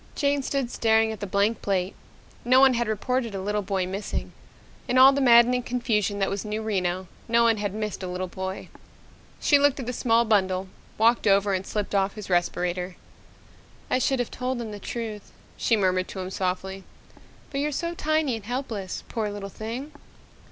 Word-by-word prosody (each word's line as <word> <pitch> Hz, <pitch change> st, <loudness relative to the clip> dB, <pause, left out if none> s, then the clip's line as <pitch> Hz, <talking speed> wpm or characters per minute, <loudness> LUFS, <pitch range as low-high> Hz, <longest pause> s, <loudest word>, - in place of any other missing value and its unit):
Jane 285 Hz, -1 st, +1 dB
stood 265 Hz, -2 st, -2 dB
staring 220 Hz, -1 st, +3 dB
at 220 Hz, -, -7 dB
the 205 Hz, -, -4 dB
blank 200 Hz, +4 st, +1 dB
plate. 190 Hz, -1 st, -1 dB, 0.5 s
No 255 Hz, +2 st, +5 dB
one 265 Hz, -1 st, +6 dB
had 240 Hz, -1 st, 0 dB
reported 230 Hz, +1 st, -1 dB
a -, -, -3 dB
little 205 Hz, +2 st, -1 dB
boy 190 Hz, -1 st, -1 dB
missing. 195 Hz, +3 st, -4 dB, 0.6 s
In 250 Hz, -, +1 dB
all 265 Hz, +1 st, +9 dB
the 280 Hz, -, 0 dB
maddening 245 Hz, 0 st, +6 dB
confusion 230 Hz, -5 st, 0 dB
that 195 Hz, -1 st, +1 dB
was 195 Hz, -1 st, -3 dB
New 215 Hz, 0 st, -3 dB
Reno, 185 Hz, -3 st, -1 dB, 0.2 s
no 235 Hz, 0 st, +4 dB
one 230 Hz, -1 st, +4 dB
had 205 Hz, -1 st, -2 dB
missed 215 Hz, -2 st, -3 dB
a 185 Hz, -, -4 dB
little 180 Hz, +1 st, -3 dB
boy. 190 Hz, +1 st, -6 dB, 0.7 s
She 285 Hz, -, +4 dB
looked 285 Hz, -1 st, +3 dB
at 260 Hz, -, -4 dB
the 250 Hz, -, -3 dB
small 235 Hz, -1 st, +2 dB
bundle, 190 Hz, -3 st, +1 dB, 0.3 s
walked 230 Hz, 0 st, +3 dB
over 200 Hz, 0 st, +4 dB
and 190 Hz, 0 st, -2 dB
slipped 210 Hz, -1 st, -3 dB
off 195 Hz, 0 st, +1 dB
his 210 Hz, -3 st, -7 dB
respirator. 180 Hz, +1 st, 0 dB, 1.0 s
"I -, -, +3 dB
should 270 Hz, +1 st, +1 dB
have 245 Hz, -2 st, -2 dB
told 255 Hz, 0 st, -2 dB
the 215 Hz, -3 st, -6 dB
truth," 220 Hz, -1 st, -6 dB, 0.2 s
she 230 Hz, -, +2 dB
murmured 185 Hz, -2 st, +1 dB
to 190 Hz, -, -7 dB
him 185 Hz, 0 st, -5 dB
softly. 190 Hz, +1 st, -3 dB, 0.7 s
"But 275 Hz, -, -2 dB
you're 295 Hz, +1 st, 0 dB
so 335 Hz, +4 st, -2 dB
tiny 310 Hz, -5 st, 0 dB
and 210 Hz, -, -12 dB
helpless. 225 Hz, -6 st, -4 dB
Poor 220 Hz, -3 st, -2 dB
little 205 Hz, -1 st, -6 dB
thing!" 235 Hz, +9 st, -6 dB
215 Hz, 185 wpm, -25 LUFS, 195-245 Hz, 1.0 s, all